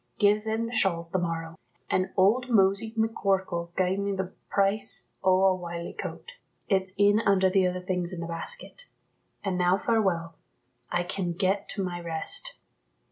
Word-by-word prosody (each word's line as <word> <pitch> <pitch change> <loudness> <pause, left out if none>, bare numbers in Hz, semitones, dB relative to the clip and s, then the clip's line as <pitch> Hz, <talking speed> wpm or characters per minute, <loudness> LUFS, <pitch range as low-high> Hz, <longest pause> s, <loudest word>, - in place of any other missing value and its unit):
Gie 210 0 +4
them 220 +1 -2
the 230 - -6
shawls 170 -6 +1
the 185 - +1
morrow. 165 -1 -4 0.3
An' 185 0 0
old 225 +7 +3
Mosey 200 0 +3
McCorkell 195 -6 0
gied 185 +1 +1
me 200 0 -1
the 190 -1 -4 0.2
price 200 +1 +1
o' 185 0 +4
a 190 -1 +5
wiley 170 -1 -6
coat; 480 - -7 0.4
it's 190 -2 0
in 205 +1 +5
under 190 -3 +3
the 190 -1 +3
other 180 0 -3
things 180 -1 -2
in 180 - -5
the 170 - -4
basket. 170 - -6 0.6
An' 190 -3 -1
now 180 +1 +3
farewell; 190 -7 0 0.6
I 175 0 +1
can 175 -1 -3
get 195 +3 0
to 200 - -1
my 175 -1 -4
rest." 165 -2 0
190 Hz, 165 wpm, -27 LUFS, 175-200 Hz, 0.6 s, a